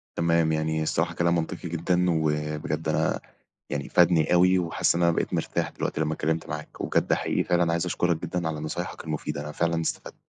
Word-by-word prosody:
تمام، 85 Hz, -1 st, +2 dB
يعني 80 Hz, 0 st, 0 dB
الصراحة 80 Hz, +2 st, 0 dB
كلام 85 Hz, 0 st, +2 dB
منطقي 85 Hz, +1 st, -3 dB
جدًا، 90 Hz, +2 st, +1 dB
وبجد 75 Hz, 0 st, -1 dB
أنا 80 Hz, -, +1 dB, 0.5 s
يعني 70 Hz, -1 st, -3 dB
فادني 85 Hz, -2 st, +4 dB
أوي، 90 Hz, +1 st, +5 dB
وحاسس 85 Hz, -1 st, +1 dB
إن 85 Hz, -, 0 dB
أنا 85 Hz, -, +5 dB
بقيت -, -, -1 dB
مرتاح -, -, -1 dB
دلوقتي -, -, -3 dB
لمّا 80 Hz, 0 st, 0 dB
اتكلمت 80 Hz, +1 st, -1 dB
معاك، -, -, -7 dB
وبجد -, -, +1 dB
حقيقي -, -, +1 dB
فعلًا 85 Hz, -1 st, +2 dB
عايز 85 Hz, +1 st, 0 dB
أشكرك 90 Hz, -1 st, +1 dB
جدًا 85 Hz, -2 st, -2 dB
على 75 Hz, -1 st, -4 dB
نصايحك 75 Hz, -, -5 dB
المفيدة، 75 Hz, -1 st, -3 dB
أنا 75 Hz, +1 st, -6 dB
فعلًا 85 Hz, +1 st, 0 dB
استفدت. 80 Hz, -, -4 dB
80 Hz, 185 wpm, -26 LUFS, 80-85 Hz, 0.5 s, أوي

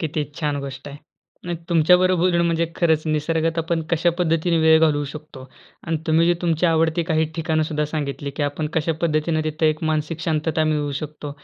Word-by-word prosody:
किती 155 Hz, -2 st, -2 dB, 0.2 s
छान 150 Hz, -2 st, -1 dB
गोष्ट 135 Hz, 0 st, -7 dB
आहे. 145 Hz, -, -9 dB, 0.5 s
नाही, 175 Hz, -1 st, -3 dB
तुमच्या 170 Hz, +1 st, +5 dB
बरोबर 185 Hz, -1 st, +2 dB
बोलून 170 Hz, -1 st, +2 dB
म्हणजे 170 Hz, 0 st, +1 dB
खरंच 160 Hz, -3 st, +2 dB
निसर्गात 160 Hz, +2 st, 0 dB
आपण 165 Hz, 0 st, -1 dB
कशा 170 Hz, +1 st, +2 dB
पद्धतीने 165 Hz, 0 st, +1 dB
वेळ 160 Hz, 0 st, +6 dB
घालवू 150 Hz, -2 st, +2 dB
शकतो. 145 Hz, -4 st, -11 dB, 0.4 s
आणि 165 Hz, 0 st, 0 dB
तुम्ही 160 Hz, +1 st, +3 dB
जे 175 Hz, -, +3 dB
तुमची 170 Hz, 0 st, +1 dB
आवडती 165 Hz, +1 st, +2 dB
काही 160 Hz, 0 st, +3 dB
ठिकाणं 160 Hz, -1 st, 0 dB
सुद्धा 150 Hz, -1 st, -1 dB
सांगितली, 145 Hz, -2 st, -4 dB
की 145 Hz, -, -4 dB
आपण 145 Hz, +2 st, -2 dB
कशा 160 Hz, +1 st, +1 dB
पद्धतीने 155 Hz, 0 st, +1 dB
तिथं 155 Hz, +1 st, 0 dB
एक 155 Hz, +1 st, 0 dB
मानसिक 155 Hz, +1 st, -1 dB
शांतता 160 Hz, -1 st, 0 dB
मिळवू 150 Hz, -2 st, 0 dB
शकतो. 150 Hz, -1 st, -7 dB
160 Hz, 190 wpm, -22 LUFS, 150-165 Hz, 0.5 s, वेळ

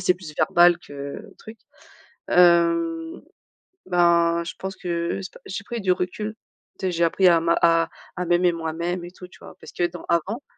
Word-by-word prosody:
c'est 180 Hz, -, +5 dB
plus 160 Hz, -5 st, -11 dB
verbal 175 Hz, 0 st, +4 dB
que, 140 Hz, +4 st, -8 dB, 0.2 s
truc. 220 Hz, 0 st, -12 dB, 0.7 s
Hem, 170 Hz, -2 st, +3 dB, 0.6 s
bah, 170 Hz, -1 st, +3 dB
je -, -, -6 dB
pense 190 Hz, 0 st, -5 dB
que 170 Hz, 0 st, -3 dB
je -, -, -6 dB
sais 185 Hz, -, -8 dB
pas. -, -, -15 dB
J'ai 195 Hz, +1 st, -6 dB
pris 235 Hz, +1 st, -5 dB
du 185 Hz, -1 st, +1 dB
recul, 210 Hz, +4 st, -3 dB, 0.4 s
tu 190 Hz, -, -2 dB
sais, -, -, -1 dB
j'ai 170 Hz, 0 st, 0 dB
appris 185 Hz, +3 st, +3 dB
à 170 Hz, -1 st, +5 dB
ma 170 Hz, 0 st, +2 dB
à 165 Hz, -1 st, +3 dB, 0.3 s
à 180 Hz, 0 st, -3 dB
m'aimer 175 Hz, +1 st, +3 dB
moi-même 170 Hz, +2 st, -3 dB
et 175 Hz, -, -10 dB
tout, 180 Hz, 0 st, -12 dB
tu -, -, -19 dB
vois? -, -, -12 dB
Parce -, -, -12 dB
que 175 Hz, -, 0 dB
dans 175 Hz, 0 st, -10 dB
avant, 190 Hz, -, -1 dB
175 Hz, 200 wpm, -23 LUFS, 170-185 Hz, 0.7 s, c'est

